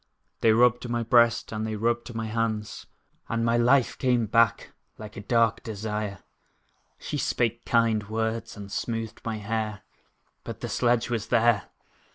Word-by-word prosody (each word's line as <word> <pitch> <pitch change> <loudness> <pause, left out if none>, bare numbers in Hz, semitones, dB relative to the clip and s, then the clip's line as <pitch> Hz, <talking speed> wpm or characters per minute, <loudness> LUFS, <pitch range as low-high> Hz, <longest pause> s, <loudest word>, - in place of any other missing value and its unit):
They 115 - +4
rubbed 120 +2 +3
my 120 0 -1
breast, 120 0 +3
and 110 0 -3
they 110 0 -3
rubbed 120 +2 -1
my 115 0 -2
hands, 110 -2 -3 0.4
And 115 0 0
my 115 0 +2
life 120 +2 +3
came 125 -3 +2
back 115 +2 +2 0.2
like 110 0 -10
a - - -6
dark 115 +1 +2
desire. 105 -3 -4 0.7
She - - -4
spake 120 -1 -1
kind 115 -3 +1
words, 110 0 -3
and 100 -1 -9
smoothed 115 0 -4
my 115 -1 -3
hair, 105 0 -3 0.6
But - - -8
the - - -4
sledge 120 -1 +1
was 115 -3 -2
there! 115 -4 +2
115 Hz, 155 wpm, -26 LUFS, 110-120 Hz, 0.7 s, They